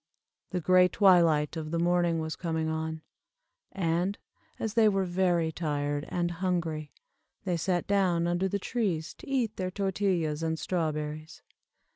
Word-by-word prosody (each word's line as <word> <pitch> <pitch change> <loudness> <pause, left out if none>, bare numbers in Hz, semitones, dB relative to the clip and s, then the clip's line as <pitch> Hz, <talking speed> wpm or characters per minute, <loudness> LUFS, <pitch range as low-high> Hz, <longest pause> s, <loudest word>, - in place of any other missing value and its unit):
The 180 - -2
gray 185 +2 +5
twilight 170 -6 +4
of 155 -1 -4
the 165 - -1
morning 175 0 +2
was 160 0 -3
coming 160 -2 -2
on, 160 0 -3 0.7
and, 180 +2 0 0.4
as 220 -2 -3
they 225 -2 +5
were 195 -2 +1
very 175 -2 +1
tired 145 -2 -2
and 175 -1 -1
hungry, 170 -4 -2 0.5
they 180 -3 0
sat 175 +1 0
down 185 -4 +2
under 175 +2 +1
the 200 - -1
trees 190 -7 -2
to - - -11
eat 245 -5 0
their 185 -1 -2
tortillas 185 -5 -1
and 160 0 -1
strawberries. 155 -2 -3
175 Hz, 145 wpm, -29 LUFS, 160-185 Hz, 0.7 s, gray